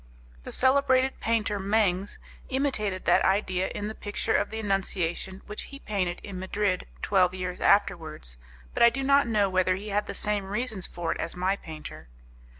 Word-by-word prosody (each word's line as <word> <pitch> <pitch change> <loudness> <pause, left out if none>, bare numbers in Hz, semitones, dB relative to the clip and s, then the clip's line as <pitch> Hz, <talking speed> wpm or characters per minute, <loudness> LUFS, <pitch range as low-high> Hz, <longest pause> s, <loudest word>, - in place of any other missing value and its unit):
The - - -6
celebrated 265 0 +3
painter 215 -3 0
Mengs 200 -1 +1 0.3
imitated 235 -9 -1
that - - +4
idea 190 -1 +1
in 205 - -4
the 215 - -4
picture 210 +1 -2
of - - +1
the 220 - -5
Annunciation 190 -2 -2
which 210 - -5
he 275 - -8
painted 190 -9 -2
in 190 -3 -6
Madrid 190 0 -1 0.2
twelve 185 -2 +3
years 180 -1 -4
afterwards, 155 - +1 0.3
but - - -2
I 235 - +9
do 270 +3 -3
not 280 0 +4
know 210 -3 +3
whether 185 -1 +2
he 205 +3 -7
had 205 +1 0
the - - -5
same 205 -1 0
reasons 210 -1 -3
for 170 -1 -3
it - - -3
as 165 - -2
my 185 +2 +1
painter. 155 - -9
200 Hz, 175 wpm, -27 LUFS, 185-220 Hz, 0.3 s, I